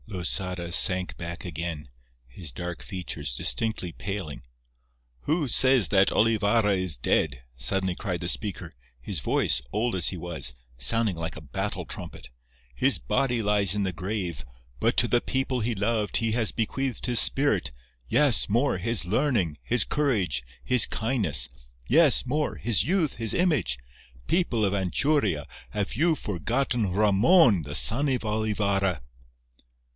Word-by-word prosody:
Losada 90 Hz, -2 st, -3 dB
sank 90 Hz, +1 st, +2 dB
back 85 Hz, +2 st, -6 dB
again, 80 Hz, -3 st, -5 dB, 0.4 s
his 70 Hz, +5 st, -6 dB
dark 90 Hz, +6 st, -6 dB
features 80 Hz, -8 st, -3 dB
distinctly 90 Hz, -, -1 dB
paling. 90 Hz, -10 st, -6 dB, 0.8 s
"Who 155 Hz, -, 0 dB
says 130 Hz, -3 st, +4 dB
that 95 Hz, -1 st, +4 dB
Olivarra 105 Hz, -1 st, +2 dB
is 90 Hz, -6 st, -1 dB
dead?" 60 Hz, +1 st, 0 dB
suddenly 90 Hz, +10 st, 0 dB
cried 90 Hz, -4 st, -4 dB
the 85 Hz, -, -4 dB
speaker, 95 Hz, -4 st, -2 dB, 0.3 s
his 90 Hz, +6 st, -3 dB
voice, -, -, +1 dB
old 115 Hz, +1 st, -1 dB
as 90 Hz, -3 st, +1 dB
he 95 Hz, -, -6 dB
was, 80 Hz, -7 st, -1 dB, 0.2 s
sounding 100 Hz, -, +2 dB
like 80 Hz, 0 st, -5 dB
a 75 Hz, -, -9 dB
battle 75 Hz, -, -4 dB
trumpet. -, -, -7 dB, 0.5 s
"His 135 Hz, -, +3 dB
body 125 Hz, -4 st, 0 dB
lies 100 Hz, -2 st, +3 dB
in 105 Hz, -, 0 dB
the 95 Hz, -1 st, -2 dB
grave, 90 Hz, -, -4 dB, 0.4 s
but -, -, +1 dB
to -, -, +5 dB
the 120 Hz, -, +2 dB
people 130 Hz, -1 st, -2 dB
he 115 Hz, +1 st, -1 dB
loved 105 Hz, +1 st, 0 dB
he 115 Hz, -1 st, 0 dB
has 115 Hz, -2 st, +1 dB
bequeathed 130 Hz, +3 st, -2 dB
his 120 Hz, -1 st, +2 dB
spirit—yes, 85 Hz, -, +1 dB
more—his 115 Hz, -3 st, 0 dB
learning, 105 Hz, -, 0 dB
his 120 Hz, -, +1 dB
courage, 100 Hz, -, 0 dB, 0.2 s
his 125 Hz, -3 st, +5 dB
kindness—yes, 100 Hz, -, +1 dB
more—his 125 Hz, -6 st, 0 dB
youth, 165 Hz, -, 0 dB
his 115 Hz, -2 st, -2 dB
image—people 105 Hz, -, -1 dB
of 100 Hz, -, 0 dB
Anchuria, 100 Hz, -, 0 dB, 0.2 s
have 100 Hz, +7 st, -3 dB
you 160 Hz, +8 st, +2 dB
forgotten 115 Hz, -, -2 dB
Ramon, 105 Hz, -, +4 dB
the 70 Hz, -1 st, -4 dB
son 140 Hz, -, +4 dB
of 125 Hz, -3 st, -1 dB
Olivarra?" 100 Hz, -5 st, 0 dB
100 Hz, 135 wpm, -26 LUFS, 85-120 Hz, 0.8 s, to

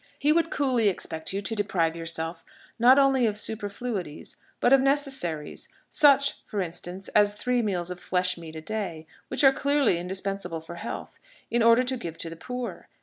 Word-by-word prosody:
He 295 Hz, +2 st, +3 dB
would 330 Hz, 0 st, +2 dB
coolly 255 Hz, -6 st, +2 dB
expect 160 Hz, -4 st, -4 dB
you 200 Hz, +1 st, -3 dB
to 210 Hz, -, -1 dB
deprive 180 Hz, -6 st, 0 dB
yourself 165 Hz, 0 st, -2 dB, 0.4 s
not 250 Hz, +3 st, +7 dB
only 270 Hz, -3 st, +4 dB
of 210 Hz, -1 st, -2 dB
superfluities, 205 Hz, -6 st, -3 dB, 0.2 s
but 245 Hz, -, +4 dB
of 270 Hz, -, +6 dB
necessaries 270 Hz, -, 0 dB, 0.2 s
such, 280 Hz, -2 st, +4 dB
for 210 Hz, -, -5 dB
instance, 180 Hz, +1 st, -4 dB
as 205 Hz, 0 st, +3 dB
three 250 Hz, +3 st, 0 dB
meals 180 Hz, -5 st, -1 dB
of 180 Hz, -, -6 dB
flesh 180 Hz, 0 st, 0 dB
meat 165 Hz, -2 st, -10 dB
a 160 Hz, -, -6 dB
day, 185 Hz, -4 st, -4 dB, 0.2 s
which -, -, 0 dB
are 270 Hz, -1 st, +7 dB
clearly 280 Hz, -10 st, +2 dB
indispensable 190 Hz, -1 st, -3 dB
for 165 Hz, +2 st, -10 dB
health -, -, -7 dB, 0.3 s
in 240 Hz, -, +2 dB
order 230 Hz, +2 st, +6 dB
to 255 Hz, +1 st, -2 dB
give 165 Hz, -8 st, -7 dB
to 165 Hz, -, -5 dB
the -, -, -7 dB
poor. 250 Hz, +7 st, -6 dB
205 Hz, 180 wpm, -26 LUFS, 170-250 Hz, 0.4 s, not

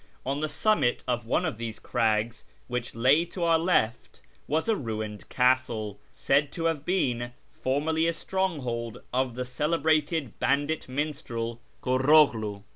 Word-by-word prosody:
On 135 Hz, +2 st, -1 dB
the 155 Hz, 0 st, -1 dB
summit 150 Hz, -, +1 dB
of 120 Hz, -2 st, -1 dB
one -, -, +1 dB
of 110 Hz, -, -3 dB
these 115 Hz, -2 st, -4 dB
crags 110 Hz, +1 st, 0 dB, 0.2 s
which 125 Hz, -2 st, -4 dB
lay 130 Hz, +8 st, +4 dB
to 175 Hz, +1 st, -5 dB
our 165 Hz, -1 st, +4 dB
left 125 Hz, -9 st, 0 dB, 0.3 s
was 155 Hz, +6 st, 0 dB
a 225 Hz, -, +3 dB
ruined 110 Hz, -, -5 dB
castle, 125 Hz, -5 st, +1 dB
said 140 Hz, +1 st, +1 dB
to 165 Hz, -, -3 dB
have 160 Hz, -4 st, 0 dB
been 120 Hz, -10 st, 0 dB, 0.2 s
formerly 160 Hz, +5 st, 0 dB
a 170 Hz, -, +1 dB
stronghold 140 Hz, -, -3 dB
of 130 Hz, -1 st, 0 dB
the 125 Hz, 0 st, -3 dB
celebrated 155 Hz, 0 st, 0 dB
bandit 145 Hz, +2 st, 0 dB
minstrel, 130 Hz, -5 st, -3 dB, 0.2 s
Kurroghlu. 130 Hz, -6 st, +3 dB
130 Hz, 140 wpm, -27 LUFS, 115-155 Hz, 0.3 s, lay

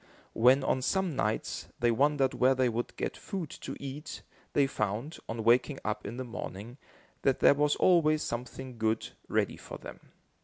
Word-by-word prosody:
When, 130 Hz, +4 st, +5 dB
on 130 Hz, -, +1 dB
some 185 Hz, +3 st, 0 dB
nights, 110 Hz, -4 st, -1 dB
they 120 Hz, 0 st, +3 dB
wondered 135 Hz, +2 st, +2 dB
where 130 Hz, +1 st, +4 dB
they 130 Hz, -1 st, +2 dB
would 120 Hz, +1 st, -3 dB
get -, -, -3 dB
food 185 Hz, -7 st, -5 dB
to -, -, -5 dB
eat, 140 Hz, +2 st, -7 dB, 0.3 s
they 140 Hz, -, +4 dB
found, 115 Hz, +4 st, -3 dB
on 115 Hz, 0 st, -3 dB
waking 125 Hz, +5 st, +4 dB
up 105 Hz, -1 st, -2 dB
in 115 Hz, +4 st, -6 dB
the 130 Hz, -, -3 dB
morning, 120 Hz, 0 st, -7 dB, 0.4 s
that 135 Hz, -2 st, +2 dB
there -, -, +7 dB
was 145 Hz, +1 st, +2 dB
always 155 Hz, -4 st, +4 dB
something 125 Hz, +1 st, -5 dB
good 110 Hz, 0 st, 0 dB, 0.2 s
ready -, -, 0 dB
for -, -, -9 dB
them. -, -, -10 dB
130 Hz, 170 wpm, -30 LUFS, 115-145 Hz, 0.4 s, there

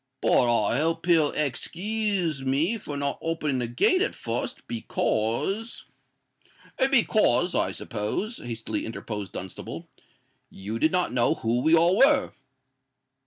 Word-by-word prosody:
But 120 Hz, -3 st, +3 dB
I 120 Hz, -, +1 dB
hope 165 Hz, +2 st, -1 dB
he'll 165 Hz, -4 st, +4 dB
ex 145 Hz, -4 st, -1 dB
kooze 190 Hz, -6 st, 0 dB
me 155 Hz, -, 0 dB
for 145 Hz, -6 st, -6 dB
not 140 Hz, 0 st, -2 dB
opening 155 Hz, -5 st, -1 dB
the 120 Hz, -, -1 dB
gate 245 Hz, -, +2 dB
at -, -, 0 dB
fust, -, -, -4 dB
because——" 120 Hz, -, -2 dB, 1.1 s
"Because, 210 Hz, -, +3 dB
I -, -, +1 dB
suppose," 125 Hz, -, -4 dB
hastily 115 Hz, -1 st, -4 dB
interposed 105 Hz, -3 st, -6 dB
Dunstable, 95 Hz, 0 st, -7 dB, 0.6 s
"you 105 Hz, +4 st, -6 dB
did 155 Hz, -, +3 dB
not 180 Hz, -8 st, 0 dB
know 120 Hz, -2 st, +2 dB
who 115 Hz, +2 st, -1 dB
we 160 Hz, +5 st, +5 dB
all 170 Hz, +4 st, +4 dB
were." 275 Hz, 0 st, +4 dB
150 Hz, 130 wpm, -26 LUFS, 120-185 Hz, 1.1 s, we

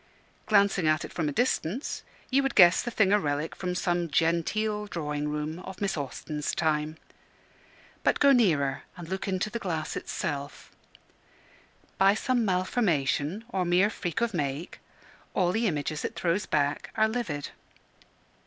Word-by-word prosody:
Glancing 200 Hz, -5 st, +3 dB
at 155 Hz, 0 st, +2 dB
it -, -, -10 dB
from 155 Hz, -3 st, -1 dB
a -, -, -2 dB
distance, 240 Hz, -, -1 dB, 0.3 s
you 270 Hz, +2 st, +4 dB
would 270 Hz, -2 st, -1 dB
guess 175 Hz, -2 st, +7 dB
the -, -, -3 dB
thing 205 Hz, -4 st, +3 dB
a 210 Hz, -, +5 dB
relic 145 Hz, -2 st, -2 dB
from 180 Hz, -1 st, -3 dB
some 175 Hz, -2 st, 0 dB
"genteel" 210 Hz, +8 st, 0 dB
drawing 150 Hz, -5 st, -3 dB
room 150 Hz, +2 st, -3 dB
of 185 Hz, 0 st, -9 dB
Miss 200 Hz, -2 st, -1 dB
Austen's 150 Hz, +1 st, -4 dB
time. 155 Hz, -1 st, 0 dB, 1.1 s
But -, -, +2 dB
go 280 Hz, -, +6 dB
nearer 155 Hz, -, +3 dB, 0.2 s
and 175 Hz, -2 st, -8 dB
look 190 Hz, +3 st, -4 dB
into 195 Hz, +2 st, -1 dB
the 235 Hz, -, -3 dB
glass 165 Hz, -6 st, -3 dB
itself. 145 Hz, -1 st, -4 dB, 1.3 s
By 195 Hz, +1 st, +6 dB
some 250 Hz, +1 st, +1 dB
malformation 185 Hz, -, 0 dB
or 190 Hz, -5 st, 0 dB
mere 180 Hz, +4 st, +3 dB
freak 180 Hz, +3 st, -3 dB
of 235 Hz, -2 st, 0 dB
make, 145 Hz, +1 st, -3 dB, 0.6 s
all 180 Hz, -2 st, +2 dB
the 225 Hz, +4 st, +1 dB
images 155 Hz, -2 st, -2 dB
it -, -, -3 dB
throws 175 Hz, +3 st, 0 dB
back 145 Hz, -1 st, 0 dB
are 220 Hz, 0 st, +4 dB
livid. 220 Hz, -, -3 dB
175 Hz, 155 wpm, -28 LUFS, 150-210 Hz, 1.3 s, guess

